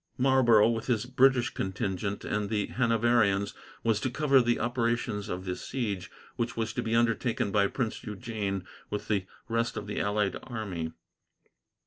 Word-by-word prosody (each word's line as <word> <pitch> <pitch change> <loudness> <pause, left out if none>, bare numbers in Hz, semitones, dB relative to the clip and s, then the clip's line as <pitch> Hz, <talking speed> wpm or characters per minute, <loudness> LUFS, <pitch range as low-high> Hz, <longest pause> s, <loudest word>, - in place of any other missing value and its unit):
Marlborough, 125 -5 +5
with 115 -1 -2
his 120 -3 +1
British 130 0 +3
contingent 95 +1 -3
and 105 -1 -1
the 105 -2 0
Hanoverians, 115 -4 +2 0.3
was 115 -2 +2
to 130 - -1
cover 140 0 +4
the 120 0 +1
operations 115 -3 -1
of 90 +1 -4
the 90 -1 -2
siege, 105 -8 -3 0.3
which 115 0 -2
was 115 -1 -1
to - - -1
be 115 +1 -1
undertaken 115 -1 +1
by 100 -1 +4
Prince 115 +1 -3
Eugene 105 -3 -3 0.2
with 105 - -4
the 100 -3 0 0.2
rest 115 +1 0
of 105 - -4
the 105 - -3
allied 100 -2 0
army. 100 -10 -4
110 Hz, 155 wpm, -29 LUFS, 100-120 Hz, 0.3 s, Marlborough